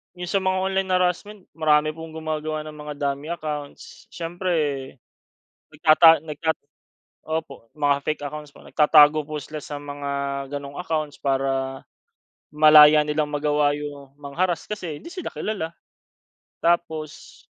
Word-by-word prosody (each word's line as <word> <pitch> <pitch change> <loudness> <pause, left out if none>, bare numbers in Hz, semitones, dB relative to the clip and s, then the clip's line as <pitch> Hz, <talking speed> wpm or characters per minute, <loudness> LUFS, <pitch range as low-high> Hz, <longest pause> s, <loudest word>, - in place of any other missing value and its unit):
iyong 180 -1 -6
sa 195 - +2
mga 190 0 0
online 190 0 -1
harassment, 185 +3 0 0.2
marami 155 -1 +3
pong 160 0 -10
gumagawa 155 -1 -3
ng 155 0 -9
mga 150 0 -7
dummy 140 +1 -2
accounts. 150 -3 -7
Siyempre, 175 +2 -3 1.2
nagtata 160 +1 +6
nagtat 160 +1 -2 0.7
opo, 155 -7 -5
mga 145 -2 +2
fake 155 0 -2
accounts 150 0 -7
po. - - -18
Nagtatago 150 0 +5
po 155 -1 -4
sila 150 +2 -7
sa 145 - -6
mga 145 0 -6 0.4
ganoong 140 -1 -6
accounts 155 -4 -3
para, 135 -1 -1 0.7
malaya 150 0 +8
nilang 150 0 -1
magawa 145 0 +2
iyong 145 -2 -7
mang-harass 165 +5 -2
kasi 175 -8 -5
hindi - - -10
sila 365 0 -6
kilala. 180 -7 -4 0.9
Tapos 160 -3 -2
155 Hz, 130 wpm, -23 LUFS, 145-165 Hz, 1.2 s, malaya